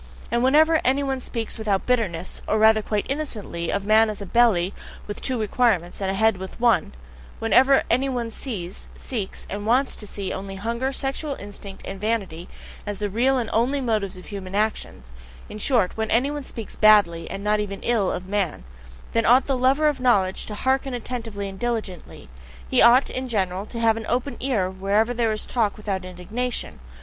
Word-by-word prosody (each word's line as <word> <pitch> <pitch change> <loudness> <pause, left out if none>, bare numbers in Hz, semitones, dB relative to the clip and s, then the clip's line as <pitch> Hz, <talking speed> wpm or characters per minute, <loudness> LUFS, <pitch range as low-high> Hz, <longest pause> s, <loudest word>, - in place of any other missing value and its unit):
And 235 0 +1
whenever 310 +4 +5
anyone 270 0 +1
speaks 230 -3 -4
without 205 -3 0
bitterness, 200 -9 0
or 215 - +2
rather 220 0 +5
quite 210 -1 -2
innocently, 220 - -3
of 200 0 -2
man 220 +1 +5
as 210 - -5
a 200 - -6
belly 200 -4 +3 0.3
with 205 - -7
two 255 -3 -1
requirements, 210 -5 +1
and 190 - 0
a 195 - -1
head 220 0 +3
with 190 +4 -8
one; 235 - +2 0.4
whenever 260 +5 +4
any 260 +4 +1
one 240 -3 -3
sees, 200 -8 -6
seeks, 215 -7 -5
and 205 +1 -5
WANTS 255 +4 +3
to 210 - -8
see 200 -1 -5
only 195 0 -6
hunger, 235 +6 -2
sexual 275 +2 -3
instinct, 200 -2 -9
and 195 0 -7
vanity 195 -6 -2 0.3
as 205 -1 -4
the 205 0 -3
real 255 +6 +2
and 240 -3 -1
only 250 +5 +2
motives 215 -7 -1
of 185 - -11
human 195 -2 -7
actions; 205 - -2 0.4
in 210 - -8
short, 225 -5 +2
when 220 0 -2
any 255 +5 +2
one 295 -1 -4
speaks 225 -4 -8
"badly" 200 -6 +4
and 195 +2 -6
not 210 0 +2
even 200 -1 -4
"ill" 225 -5 +1
of 180 - -4
man, 195 - -1 0.5
then 230 0 +2
ought 250 +3 +6
the 270 - 0
lover 265 +4 +3
of 295 - 0
knowledge 200 -7 +2
to 210 - -5
hearken 265 +2 0
attentively 225 -4 -5
and 190 -1 -9
diligently; 220 - -4 0.4
he - - +3
ought, 245 +3 +6
in 255 0 -3
general, 195 -3 -1
to 230 - -7
have 225 -1 +3
an 225 - -6
open 255 +3 -1
ear 240 -9 0
wherever 200 +5 0
there 230 -2 +1
is 215 - -2
talk 225 -4 0
without 200 -3 -3
indignation. 185 - -4
220 Hz, 190 wpm, -24 LUFS, 195-250 Hz, 0.5 s, ought